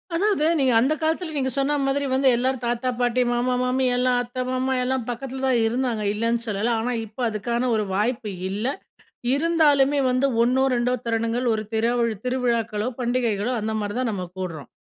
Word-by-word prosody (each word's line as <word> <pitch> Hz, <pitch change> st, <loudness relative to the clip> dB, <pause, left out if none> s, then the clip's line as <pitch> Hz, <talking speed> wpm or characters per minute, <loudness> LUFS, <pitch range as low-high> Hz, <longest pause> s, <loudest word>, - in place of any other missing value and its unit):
அதாவது, 395 Hz, -3 st, +1 dB, 0.2 s
நீங்க 260 Hz, -3 st, +3 dB
அந்த 270 Hz, +6 st, +2 dB
காலத்துல 320 Hz, +1 st, -1 dB
நீங்க 265 Hz, -1 st, 0 dB
சொன்ன 290 Hz, +2 st, +1 dB
மாதிரி 280 Hz, +1 st, 0 dB
வந்து 265 Hz, +1 st, +2 dB
எல்லாரும் 255 Hz, +1 st, 0 dB
தாத்தா, 240 Hz, +1 st, -1 dB
பாட்டி, 245 Hz, 0 st, +2 dB
மாமா, 245 Hz, +1 st, +1 dB
மாமி 255 Hz, +1 st, +1 dB
எல்லாம் 250 Hz, 0 st, +2 dB
அத்த, 250 Hz, +1 st, -4 dB
மாமா 260 Hz, +1 st, 0 dB
எல்லாம் 255 Hz, -2 st, -1 dB
பக்கத்துல 265 Hz, +2 st, -5 dB
தான் 250 Hz, -2 st, +3 dB
இருந்தாங்க, 235 Hz, -2 st, -1 dB
இல்லன்னு 230 Hz, +2 st, 0 dB
சொல்லல. 220 Hz, +2 st, 0 dB
ஆனா 250 Hz, +2 st, -1 dB
இப்ப 215 Hz, +4 st, -9 dB
அதுக்கான 235 Hz, +4 st, -1 dB
ஒரு 215 Hz, -, +1 dB
வாய்ப்பு 215 Hz, +1 st, -1 dB, 0.2 s
இல்ல. 205 Hz, +4 st, -3 dB, 0.7 s
இருந்தாலுமே 290 Hz, -3 st, +3 dB
வந்து 255 Hz, +2 st, +2 dB, 0.2 s
1னோ, 255 Hz, +2 st, +2 dB
2டோ 245 Hz, +1 st, +1 dB
தருணங்கள் 230 Hz, +2 st, 0 dB
ஒரு 215 Hz, -, -2 dB
தெருவி 230 Hz, 0 st, +1 dB
திருவிழாக்களோ, 235 Hz, -3 st, 0 dB
பண்டிகைகளோ 240 Hz, -3 st, 0 dB
அந்தமாதிரி 215 Hz, 0 st, -2 dB
தான் 245 Hz, -3 st, 0 dB
நம்ம 185 Hz, -3 st, -4 dB
குடுறோம். 165 Hz, -7 st, -5 dB
245 Hz, 165 wpm, -23 LUFS, 225-260 Hz, 0.7 s, நீங்க